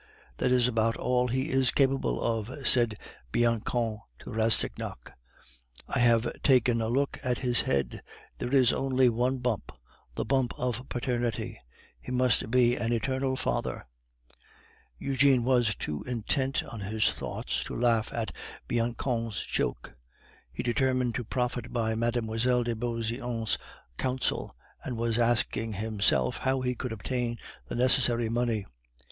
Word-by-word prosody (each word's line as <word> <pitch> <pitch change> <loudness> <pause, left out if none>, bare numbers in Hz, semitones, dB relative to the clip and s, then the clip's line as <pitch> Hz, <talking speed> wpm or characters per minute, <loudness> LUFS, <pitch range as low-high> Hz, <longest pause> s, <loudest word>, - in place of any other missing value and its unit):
"That - - +1
is 125 -1 +4
about 115 -1 +1
all 125 0 +1
he 130 +4 -1
is 130 -1 +4
capable 135 - +2
of," 115 +5 -2
said 120 -4 +3 0.3
Bianchon 115 -1 +1 0.2
to - - -9
Rastignac; 110 - 0 0.7
"I - - -1
have 120 -1 +2
taken 125 -3 +4
a 110 - 0
look 140 +4 0
at 125 -1 0
his 125 -2 +1
head; 70 -1 -1 0.4
there 120 - -3
is 130 -3 +5
only 130 -1 +3
one 125 +3 +1
bump 125 -4 -2 0.4
the - - -2
bump 130 0 +1
of 125 +1 -3
Paternity; 120 -2 -2 0.4
he - - -7
must 125 -3 +2
be 120 0 +4
an 115 0 -1
eternal 130 +3 0
father." - - -2 1.1
Eugene 135 -2 +3
was 120 -3 +3
too 75 -1 -4
intent 130 +3 0
on 115 - -8
his 105 +2 +1
thoughts - - -3
to - - -6
laugh 115 -2 +2
at 115 -2 -3 0.3
Bianchon's 115 -1 -1
joke. - - -2 0.6
He 70 - -4
determined 130 0 +1
to 125 - -2
profit 125 +1 -2
by 110 -2 0
Mme. 115 +1 +1
de 120 +1 0
Beauseant's 115 -1 -2 0.4
counsels, 130 0 -1 0.3
and 125 - -4
was 115 0 0
asking 115 -1 +1
himself 110 +3 +1
how 130 0 0
he 125 0 0
could 125 0 -5
obtain 120 +1 -2 0.3
the - - -5
necessary 120 -2 +3
money. 115 -3 0
120 Hz, 140 wpm, -29 LUFS, 115-125 Hz, 1.1 s, is